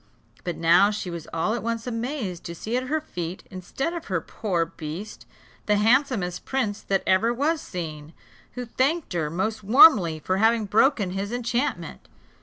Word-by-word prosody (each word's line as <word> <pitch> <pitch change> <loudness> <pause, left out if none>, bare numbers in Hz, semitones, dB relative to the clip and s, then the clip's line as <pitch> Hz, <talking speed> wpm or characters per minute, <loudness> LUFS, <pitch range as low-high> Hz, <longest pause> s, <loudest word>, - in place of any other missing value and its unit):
But 175 - -4
now 170 +4 +5
she 205 -4 -4
was 170 -2 -7
all 165 +6 0
at 240 - -2
once 230 0 -3
amazed 230 - -4
to 170 - -6
see 220 +7 -4
at 255 +1 -1
her 315 +4 0
feet, 175 - -6
instead 195 - -4
of 340 -2 -6
her 185 -4 -1
poor 175 0 -2
beast, 165 +6 -8 0.4
the 210 - +4
handsomest 220 -4 +1
prince 220 -6 -2
that 195 -1 -1
ever 195 +5 +3
was 290 +6 0
seen, 155 -3 -7 0.4
who 250 0 -5
thanked 275 - 0
her 160 -4 -1
most 210 +6 -2
warmly 215 - +6
for 185 +4 -1
having 225 +1 +3
broken 210 -1 +2
his 195 +3 -3
enchantment. 245 +2 -3
210 Hz, 170 wpm, -25 LUFS, 180-245 Hz, 0.4 s, warmly